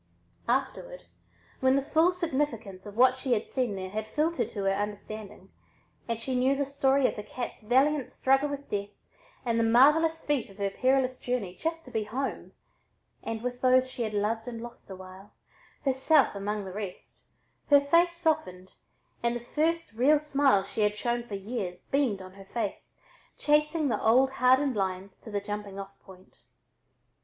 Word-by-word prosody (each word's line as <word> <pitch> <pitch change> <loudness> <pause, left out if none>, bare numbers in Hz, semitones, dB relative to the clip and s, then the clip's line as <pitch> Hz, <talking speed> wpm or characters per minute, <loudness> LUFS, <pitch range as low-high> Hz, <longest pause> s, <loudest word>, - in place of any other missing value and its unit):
Afterward - - -2 0.6
when 260 0 +4
the 275 - +3
full 320 +5 +3
significance 260 - -2
of 205 +1 -10
what 255 +1 +5
she 260 -1 0
had 215 - -2
seen 250 -6 -1
there 185 -1 -5
had 215 +1 -3
filtered 320 +7 0
to 200 - -5
her 195 - +2
understanding 205 -1 -5 0.6
and 230 -1 -1
she 245 +4 -4
knew 255 +2 +3
the 280 0 0
story 275 -1 +2
of - - -3
the - - -5
cat's 240 +4 -6
valiant 265 +5 +2
struggle 270 +2 +2
with 285 0 -6
death 200 0 -3 0.6
and 230 -1 +1
the - - +3
marvelous 300 +8 +4
feat 290 -7 0
of 195 - -15
her 200 -1 -1
perilous 255 +2 +1
journey 245 -8 -2
just 325 - -4
to 255 - -12
"be 220 -2 -1
home" 260 +6 -4 0.7
and 225 0 -5
with 245 0 -4
those 255 0 +4
she 245 - -6
had 215 -2 -2
"loved 220 +3 -1
and 235 -2 -5
lost 235 -2 -10
a 190 - -6
while," 185 +2 -13 0.5
herself 270 +2 +3
among 205 +1 -3
the 190 - -7
rest, 200 -3 -7 0.5
her 285 -1 +8
face 335 +5 +3
softened 310 - -1 0.5
and 235 0 +1
the - - -2
first 320 +5 -1
real 265 +7 +4
smile 280 -8 +2
she 200 +3 -4
had 210 0 +2
shown 240 +2 -1
for 235 -4 -7
years 195 -3 -5
beamed 250 -9 0
on 185 0 -12
her 195 0 -13
face, 215 0 -5 0.4
chasing 300 +1 +2
the 220 -5 -1
old 255 +4 +4
hardened 260 +1 +3
lines 190 -1 -3
to - - -11
the 205 -1 -1
jumping 205 -1 -6
off 195 0 -9
point. 190 -1 -17
240 Hz, 180 wpm, -28 LUFS, 205-280 Hz, 0.7 s, her